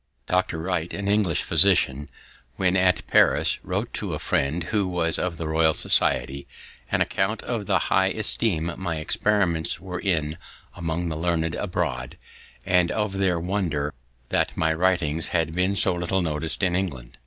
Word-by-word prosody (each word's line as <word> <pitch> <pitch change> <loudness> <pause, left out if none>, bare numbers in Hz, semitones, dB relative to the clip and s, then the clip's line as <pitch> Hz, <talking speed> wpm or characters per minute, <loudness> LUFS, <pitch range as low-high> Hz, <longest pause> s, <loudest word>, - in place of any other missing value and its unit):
Dr. 90 0 0
Wright, 85 0 -2
an 100 0 -4
English 100 -5 +1
physician, 70 +2 +3 0.5
when 95 -1 +1
at 90 -1 +2
Paris, - - +3
wrote - - -3
to - - -3
a - - -3
friend, 75 +6 -1
who 100 -3 +1
was 85 -2 0
of 90 -2 -2
the 80 - -4
Royal 80 0 +3
Society, 70 +1 +1 0.4
an - - +1
account 100 +4 -1
of 115 -5 -4
the - - +3
high 95 0 +2
esteem 95 -5 -1
my 90 -3 -3
experiments 85 0 0
were 90 0 -6
in 80 -5 -1 0.4
among 85 0 -3
the 80 - -4
learned 80 0 -1
abroad, 65 -10 -3 0.5
and 90 -2 +2
of 105 -3 -2
their 90 -3 +1
wonder 85 -6 -2 0.4
that - - 0
my 80 0 +2
writings 80 -3 +1
had 80 -2 -1
been 90 +3 +1
so 95 0 +6
little 90 +2 -1
noticed 80 +3 -2
in 90 -2 +2
England. 65 -11 -4
85 Hz, 160 wpm, -24 LUFS, 80-95 Hz, 0.5 s, so